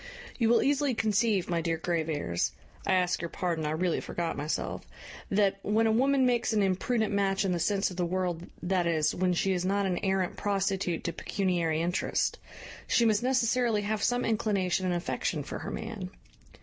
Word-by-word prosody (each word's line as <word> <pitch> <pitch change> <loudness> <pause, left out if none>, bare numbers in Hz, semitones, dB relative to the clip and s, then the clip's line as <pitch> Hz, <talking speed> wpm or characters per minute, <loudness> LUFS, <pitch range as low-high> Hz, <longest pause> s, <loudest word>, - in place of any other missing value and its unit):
"You 225 -2 +3
will 235 - +4
easily 285 -2 +1
conceive, 215 -3 +1
my 170 -1 0
dear 165 -1 -1
Graveairs 160 - -1 0.3
(I - - +3
ask 180 -1 +1
your 170 - -3
pardon, 165 -4 -2
I - - -1
really 165 +2 0
forgot 170 -1 -3
myself), 150 +2 -3 0.5
that, 195 -1 +2
when 215 +3 +2
a 220 - +3
woman 265 +3 +3
makes 245 -2 +1
an 210 -2 +3
imprudent 210 +3 0
match 195 -1 +1
in 190 - +1
the 175 - 0
sense 195 +2 +1
of 180 - -9
the 180 - +1
world, 180 -1 -2 0.2
that 180 -1 +1
is, 155 -3 +2
when 180 0 +1
she 190 +2 +1
is 180 -1 -1
not 200 +2 +1
an 180 -2 0
arrant 190 -2 0
prostitute 195 -3 -1
to 170 - -2
pecuniary 170 -5 0
interest, 175 +1 0 0.5
she 235 - +3
must 215 -1 +3
necessarily 245 -3 +2
have 210 0 -1
some 245 +3 +1
inclination 195 -5 0
and 180 - +1
affection 175 - -2
for - - -6
her - - -6
man. 215 -5 -5
195 Hz, 190 wpm, -29 LUFS, 175-220 Hz, 0.5 s, will